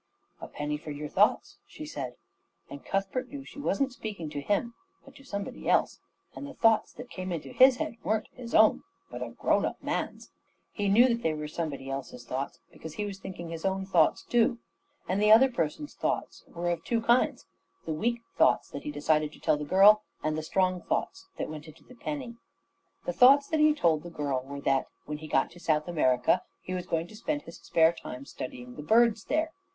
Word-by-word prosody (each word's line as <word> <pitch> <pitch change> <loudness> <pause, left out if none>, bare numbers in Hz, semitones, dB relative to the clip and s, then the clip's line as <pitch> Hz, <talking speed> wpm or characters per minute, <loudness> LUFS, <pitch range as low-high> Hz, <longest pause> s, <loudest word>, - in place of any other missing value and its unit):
"A - - -6
penny 150 0 -3
for 155 - -9
your 150 0 -5
thoughts," - - +2
she - - -9
said, - - -6 0.6
and 140 - -8
Cuthbert 195 +6 -2
knew 285 -1 -7
that 270 - -14
she - - -11
wasn't 275 -2 0
speaking 200 -10 -6
to 145 -1 -4
him, 205 +8 0 0.3
but 275 - -15
to 275 - -15
somebody 200 -6 -5
else; - - +2 0.4
and 285 - -7
the 280 - -10
thoughts 225 -1 +3
that 250 - -10
came 185 0 -5
into 165 -3 -4
his 260 0 +7
head 235 - -4
weren't 220 0 0
his 240 -2 -6
own, 220 0 +6 0.3
but - - -7
a - - -3
grown - - +1
up - - -2
man's. - - -3 0.4
He 205 -2 -1
knew 235 +6 +6
that 235 -1 0
they 160 -6 0
were 150 0 -5
somebody 150 -4 -4
else's 130 -3 -6
thoughts, 130 +3 -4
because 160 -1 -10
he 210 - -2
was 195 -2 -6
thinking 185 -3 -7
his 165 -1 -6
own 190 0 -1
thoughts 175 -5 +3
too; 240 +1 +2 0.5
and 190 +2 0
the 210 0 +5
other 255 +4 +7
person's 205 - -3
thoughts - - -3
were 175 0 -2
of 170 - -3
two 230 -1 0
kinds 235 +2 +2 0.4
the 160 - -2
weak 235 +9 -1
thoughts - - +3
that 140 - -6
he - - -5
decided 150 +1 +1
to - - -15
tell 155 - +2
the 150 - -5
girl, 200 +6 +7 0.2
and 155 0 0
the 155 - -2
strong 185 +2 0
thoughts 385 - -3
that - - -3
went 155 0 -8
into 155 0 -15
the - - -16
penny. 255 -2 -6 0.7
The - - -1
thoughts 280 +3 +6
that 315 - +1
he 305 0 +5
told 165 - +2
the 175 - -9
girl 145 -5 -2
were 140 +1 -7
that, 135 -1 +1 0.2
when 150 0 -5
he 155 - -8
got 135 - +1
to 175 - -14
South 155 -2 0
America, 130 -7 +2 0.2
he 185 - -5
was 180 -1 -4
going 165 -1 0
to - - -12
spend 290 +7 -3
his 165 - -11
spare 165 0 +3
time 130 -5 -8
studying 125 -2 -8
the - - -5
birds 220 +5 +3
there. 315 +1 0
185 Hz, 215 wpm, -29 LUFS, 150-235 Hz, 0.7 s, his